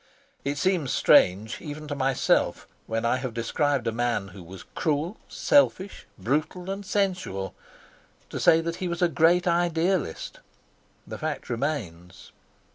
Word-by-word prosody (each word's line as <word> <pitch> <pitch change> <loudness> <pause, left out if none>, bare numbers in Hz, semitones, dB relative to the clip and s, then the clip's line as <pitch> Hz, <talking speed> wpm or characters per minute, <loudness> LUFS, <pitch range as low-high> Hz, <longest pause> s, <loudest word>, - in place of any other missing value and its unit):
It 140 +1 -2
seems 175 -6 +1
strange 100 +5 +4
even 150 -1 -7
to 145 - -3
myself, 135 -2 +1 0.2
when 115 +1 -1
I 120 +2 +2
have 130 -3 -5
described 135 +2 0
a 115 - +1
man 115 -4 -1
who 95 +1 -11
was 90 +2 -11
cruel, 160 +6 -1
selfish, 200 -9 +2
brutal 155 +8 -2
and 195 +1 -5
sensual, 185 - -1 0.8
to - - -4
say 160 - +5
that 170 +1 -3
he 185 - -3
was 170 0 -2
a - - +6
great 170 +2 +3
idealist. 170 - 0 0.7
The - - -8
fact - - -4
remains. 95 - -4
145 Hz, 140 wpm, -26 LUFS, 115-175 Hz, 0.8 s, a